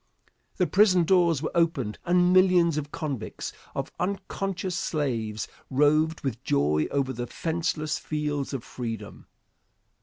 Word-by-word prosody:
The 180 - +3
prison 185 -2 +4
doors 170 -4 +3
were - - -2
opened 155 -11 0
and 180 +1 +4
millions 180 -3 +5
of 150 -1 -3
convicts, 140 -9 -4 0.2
of - - -3
unconscious 190 -1 -2
slaves, 115 - -2 0.2
roved 155 +4 +3
with 130 -3 -4
joy 75 +2 +2
over 135 -2 0
the 120 0 -4
fenceless 160 -1 -2
fields 150 -2 -2
of 135 -4 -4
freedom. 115 -4 -6
155 Hz, 125 wpm, -27 LUFS, 130-175 Hz, 0.2 s, millions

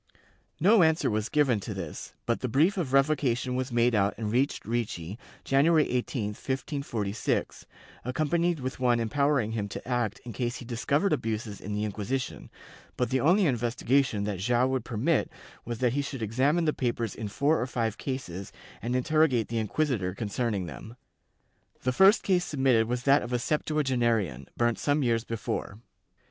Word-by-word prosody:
No 205 +5 +6
answer 160 -5 +3
was 105 +1 -1
given 140 -7 +2
to 100 +1 -6
this, 85 -5 -7
but 115 - 0
the 130 - -2
brief 150 - +3
of 170 -9 -2
revocation 135 -3 +2
was 130 0 -2
made 120 0 +3
out 100 -2 +2
and 105 -1 -3
reached 130 +5 0
Ricci, 110 -4 -3 0.2
January 155 +3 +4
18, 125 -3 -1
1546, 120 -3 -3 0.4
accompanied 155 +5 0
with 130 +1 -4
one 120 -2 +3
empowering 125 0 +1
him 105 -3 -3
to - - -7
act 120 -4 -1
in 120 - -6
case 120 +3 -2
he 125 - -8
discovered 140 - 0
abuses 110 -5 -3
in 105 +1 -4
the 105 - -1
Inquisition, 110 +5 -4 0.5
but 125 - 0
the 130 - +2
only 180 - +4
investigation 125 -2 +1
that 100 -3 -3
Joao 120 +5 +2
would 130 -3 -1
permit 110 -3 0 0.4
was 120 0 -4
that 125 0 +1
he 145 - +1
should 135 -4 -5
examine 135 +10 +1
the 155 - +2
papers 120 -4 -2
in 110 - -5
four 140 +9 +1
or 125 - -1
five 115 -3 -2
cases 100 -9 -5 0.3
and 120 +3 -2
interrogate 135 -3 +2
the 115 0 -1
inquisitor 110 -5 -1
con 105 0 -4
cerning 105 -4 -1
them. 90 - -9 0.9
The 130 - +1
first 195 - +6
case 180 -2 +2
submitted 130 -7 +2
was 125 +1 -2
that 140 +2 +5
of 120 - -6
a - - +3
septua 150 +4 0
genarian, 115 - 0
burnt 120 -1 +1
some 145 0 +1
years 115 -2 +1
before. 110 -3 -4
125 Hz, 175 wpm, -28 LUFS, 110-140 Hz, 0.9 s, No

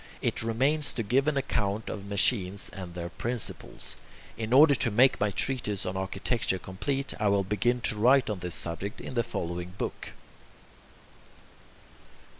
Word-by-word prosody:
It - - -1
remains 135 +7 +1
to 115 - -1
give 130 +7 +2
an 150 -2 +2
account 105 -5 -1
of 100 -1 -5
machines 100 -1 +1
and 90 -2 -8
their 85 -1 -4
principles. 120 +5 -5 0.4
In 110 0 -4
order 145 +3 +8
to 130 -2 +2
make 125 +5 +4
my 105 - +2
treatise 105 -3 0
on 90 - -3
architecture 95 +2 -1
complete, 135 +10 -3
I 105 - +2
will 100 -1 +3
begin 120 +5 0
to 110 - 0
write 130 +4 +5
on 105 -3 -2
this 90 -1 -4
subject 90 +5 -4
in - - -7
the 120 - +2
following 90 -4 -4
book. - - -5
105 Hz, 155 wpm, -28 LUFS, 95-125 Hz, 0.4 s, order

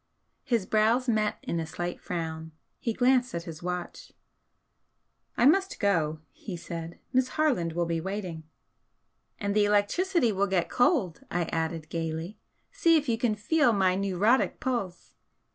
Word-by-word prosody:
His 230 -6 0
brows 225 +5 +2
met 215 -3 +1
in 170 - -2
a 160 - -3
slight 175 +2 -5
frown. 160 -2 -5 0.3
He 230 - -1
glanced 250 -1 +2
at 170 - -3
his 165 -2 -9
watch. 180 - -5 1.3
"I 240 - +4
must 380 +7 +3
go," 160 -7 +1
he 190 -5 -7
said 170 0 -7 0.2
"Miss 255 0 +3
Harland 250 - +1
will 170 +1 0
be 165 -1 -1
waiting." 185 -3 -5 1.0
"And 200 0 -1
the 210 -1 +4
electricity 235 - +2
will 200 0 +1
get 185 -3 0
cold!" 245 - +2
I 175 0 0
added, 160 -1 -2
gaily. 165 +3 -4 0.3
"See 330 -1 +4
if 295 -1 -2
you 225 -2 0
can 235 -3 +1
feel 245 +3 +2
my 190 -3 +3
'neurotic' 200 +6 +1
pulse!" 200 -9 -3
200 Hz, 150 wpm, -28 LUFS, 170-240 Hz, 1.3 s, I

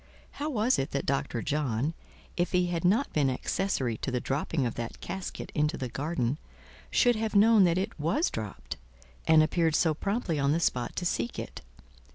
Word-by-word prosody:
How 295 +2 -4
was 245 -2 +2
it 135 - -1
that 140 - -1
Dr. 130 -4 -1
John, 145 0 0 0.4
if 175 +2 -1
he 180 0 +3
had 165 - -2
not 210 +10 +2
been 145 -3 +3
accessory 130 - -1
to - - -3
the 125 -1 0
dropping 140 +2 -1
of 120 - -1
that 115 -1 -6
casket 190 -2 -6
into 150 +2 +1
the 130 - -4
garden, 135 +1 -1 0.5
should 245 -1 +4
have 220 -1 -2
known 210 -1 +7
that 170 0 +2
it 195 0 -3
was 170 - +1
dropped, 105 -3 -6 0.5
and 160 -1 +7
appeared 160 0 +1
so 160 -1 +3
promptly 195 -2 -1
on 140 +1 +2
the 165 - +1
spot 125 -7 0
to 175 - -3
seek 120 -8 -1
it? - - -6
155 Hz, 190 wpm, -29 LUFS, 135-190 Hz, 0.5 s, known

